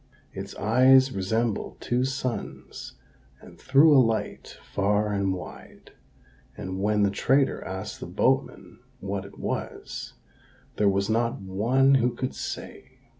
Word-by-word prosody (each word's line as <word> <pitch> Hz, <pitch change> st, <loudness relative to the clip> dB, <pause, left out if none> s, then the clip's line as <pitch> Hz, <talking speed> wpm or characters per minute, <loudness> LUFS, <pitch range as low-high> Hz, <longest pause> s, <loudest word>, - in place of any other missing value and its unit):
Its 100 Hz, +1 st, -7 dB
eyes 130 Hz, +5 st, +5 dB
resembled 110 Hz, +2 st, -2 dB
two 125 Hz, +1 st, 0 dB
suns, 130 Hz, -5 st, -5 dB, 0.4 s
and -, -, -16 dB
threw 145 Hz, +3 st, +5 dB
a 135 Hz, -, +8 dB
light 115 Hz, -2 st, -2 dB, 0.2 s
far 105 Hz, +1 st, +1 dB
and 100 Hz, -1 st, 0 dB
wide; 90 Hz, -1 st, -9 dB, 0.7 s
and 95 Hz, 0 st, -5 dB
when 105 Hz, 0 st, +2 dB
the 100 Hz, -, +2 dB
trader 135 Hz, +7 st, +1 dB
asked 95 Hz, 0 st, -6 dB
the -, -, -7 dB
boatmen -, -, -1 dB, 0.2 s
what 100 Hz, 0 st, -4 dB
it 100 Hz, -, -13 dB
was, -, -, -5 dB, 0.6 s
there 105 Hz, -1 st, +3 dB
was 100 Hz, 0 st, 0 dB
not 115 Hz, +2 st, 0 dB
one 115 Hz, +8 st, +2 dB
who 125 Hz, -2 st, +2 dB
could 130 Hz, -, -3 dB
say. -, -, -7 dB
105 Hz, 130 wpm, -26 LUFS, 100-130 Hz, 0.7 s, a